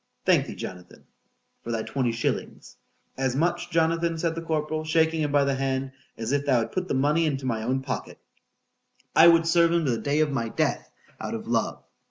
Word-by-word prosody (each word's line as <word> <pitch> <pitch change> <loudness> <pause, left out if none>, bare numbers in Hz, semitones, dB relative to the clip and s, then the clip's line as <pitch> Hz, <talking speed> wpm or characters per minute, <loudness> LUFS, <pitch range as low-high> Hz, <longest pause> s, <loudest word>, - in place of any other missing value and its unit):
—Thank - - +3
thee, - - -7
Jonathan! 90 -1 -9 0.6
for - - -8
thy 115 -1 -1
twenty 130 -4 -1
shillings,—as 125 +2 -4
much, 170 +5 0
Jonathan, 165 0 +1
said 165 0 -1
the 165 - -5
corporal, 155 -1 -2
shaking 160 0 +2
him 145 -1 0
by 145 -1 +4
the 140 0 +1
hand, 135 0 -2 0.3
as 115 +2 -3
if 145 0 +1
thou 130 -4 +3
hadst 115 0 -5
put 185 0 -2
the - - -1
money 150 +5 +2
into 135 -3 -2
my 115 -3 -1
own 130 +4 -1
pocket.——I 135 +4 -2
would 165 -1 +6
serve 170 0 +4
him 170 -2 +1
to 130 - +1
the 115 - -1
day 145 +1 0
of 155 -2 +1
my 115 -4 -2
death - - -1 0.3
out - - -4
of - - -6
love. - - -1
145 Hz, 200 wpm, -26 LUFS, 130-165 Hz, 0.6 s, would